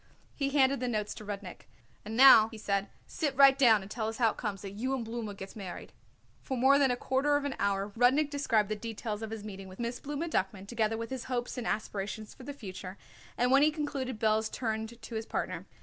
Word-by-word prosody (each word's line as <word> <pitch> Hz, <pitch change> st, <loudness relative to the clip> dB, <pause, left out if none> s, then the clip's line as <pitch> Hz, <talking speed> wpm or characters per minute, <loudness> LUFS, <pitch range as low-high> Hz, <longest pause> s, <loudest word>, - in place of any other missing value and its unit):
He 275 Hz, -2 st, -1 dB
handed 275 Hz, -1 st, +3 dB
the 250 Hz, -, -2 dB
notes 215 Hz, -3 st, -2 dB
to -, -, -10 dB
Rudnik. 200 Hz, -3 st, -7 dB, 0.4 s
"And 220 Hz, +2 st, -5 dB
now," 250 Hz, -4 st, +9 dB
he 225 Hz, -, -10 dB
said, 200 Hz, -2 st, -1 dB, 0.2 s
"sit 290 Hz, -4 st, -2 dB
right 275 Hz, -1 st, +8 dB
down 230 Hz, -7 st, +5 dB
and 195 Hz, -, -12 dB
tell 220 Hz, -3 st, -2 dB
us 225 Hz, -, -4 dB
how 230 Hz, -3 st, +3 dB
it -, -, -13 dB
comes 205 Hz, -4 st, -4 dB
that 195 Hz, -, -6 dB
you 255 Hz, +7 st, -2 dB
and 240 Hz, -3 st, -4 dB
Blooma 225 Hz, -3 st, -5 dB
gets 195 Hz, 0 st, -9 dB
married." 195 Hz, -4 st, -8 dB, 0.5 s
For 265 Hz, -, -4 dB
more 270 Hz, +3 st, +5 dB
than 275 Hz, -2 st, +4 dB
a 245 Hz, -, +1 dB
quarter 265 Hz, +4 st, +1 dB
of 290 Hz, -, -3 dB
an 285 Hz, -, -1 dB
hour 200 Hz, 0 st, 0 dB
Rudnik 265 Hz, +5 st, +3 dB
described 225 Hz, -8 st, +1 dB
the 215 Hz, -, -1 dB
details 215 Hz, 0 st, -5 dB
of 220 Hz, -, -4 dB
his 220 Hz, -2 st, -6 dB
meeting 195 Hz, -2 st, -8 dB
with 185 Hz, 0 st, -12 dB
Miss 235 Hz, +1 st, -3 dB
Blooma 295 Hz, +4 st, -4 dB
Duckman, 190 Hz, -, -2 dB
together 225 Hz, -1 st, 0 dB
with 230 Hz, +1 st, -5 dB
his 260 Hz, -2 st, -4 dB
hopes 245 Hz, -1 st, -3 dB
and 245 Hz, -3 st, -4 dB
aspirations 210 Hz, 0 st, -3 dB
for -, -, -15 dB
the 275 Hz, +3 st, -6 dB
future, 190 Hz, -7 st, -8 dB, 0.4 s
and 245 Hz, +1 st, +2 dB
when 275 Hz, +1 st, +6 dB
he 300 Hz, -, +6 dB
concluded 280 Hz, -6 st, -3 dB
Belz 220 Hz, 0 st, +1 dB
turned 220 Hz, 0 st, -3 dB
to 230 Hz, +1 st, -10 dB
his 220 Hz, 0 st, -4 dB
partner. -, -, -3 dB
225 Hz, 235 wpm, -30 LUFS, 210-265 Hz, 0.5 s, now